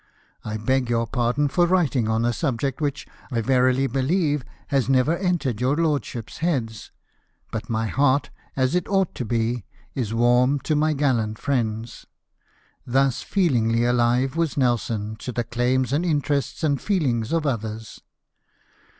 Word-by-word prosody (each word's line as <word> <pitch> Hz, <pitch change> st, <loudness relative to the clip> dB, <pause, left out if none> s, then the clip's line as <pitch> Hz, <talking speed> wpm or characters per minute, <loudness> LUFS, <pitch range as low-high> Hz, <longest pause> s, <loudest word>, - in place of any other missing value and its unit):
I 110 Hz, 0 st, -4 dB
beg 125 Hz, +3 st, 0 dB
your 115 Hz, -1 st, +1 dB
pardon 125 Hz, +4 st, 0 dB
for 175 Hz, +6 st, +2 dB
writing 150 Hz, -11 st, +1 dB
on 110 Hz, +1 st, +1 dB
a 120 Hz, -, +1 dB
subject 135 Hz, +2 st, -2 dB
which, 145 Hz, -1 st, -2 dB, 0.2 s
I 120 Hz, -4 st, -1 dB
verily 130 Hz, +2 st, +2 dB
believe, 145 Hz, +2 st, 0 dB, 0.3 s
has 135 Hz, -2 st, +1 dB
never 135 Hz, +5 st, +3 dB
entered 170 Hz, -, -1 dB
your 130 Hz, +3 st, +2 dB
lordships' 145 Hz, -8 st, -2 dB
heads; 125 Hz, -, -2 dB, 0.6 s
but 115 Hz, +2 st, -5 dB
my 115 Hz, -1 st, 0 dB
heart, 130 Hz, +5 st, +1 dB, 0.2 s
as 130 Hz, -1 st, +1 dB
it 180 Hz, -1 st, 0 dB
ought 195 Hz, -2 st, +1 dB
to 125 Hz, -, -4 dB
be, 115 Hz, 0 st, -1 dB, 0.3 s
is 120 Hz, -6 st, -2 dB
warm 120 Hz, +4 st, +3 dB
to 155 Hz, -, 0 dB
my 155 Hz, +1 st, +2 dB
gallant 120 Hz, -7 st, 0 dB
friends." 115 Hz, -4 st, -2 dB, 0.8 s
Thus 135 Hz, +1 st, +1 dB
feelingly 120 Hz, -, +1 dB
alive 125 Hz, +3 st, +2 dB
was 165 Hz, -3 st, -1 dB
Nelson 115 Hz, -4 st, 0 dB
to 125 Hz, -, -6 dB
the 120 Hz, 0 st, -2 dB
claims 125 Hz, +3 st, 0 dB
and 155 Hz, +4 st, +1 dB
interests 145 Hz, -3 st, -1 dB
and 145 Hz, -3 st, +1 dB
feelings 130 Hz, -, 0 dB
of 165 Hz, -2 st, 0 dB
others. 110 Hz, -4 st, -4 dB
130 Hz, 150 wpm, -23 LUFS, 115-145 Hz, 0.8 s, never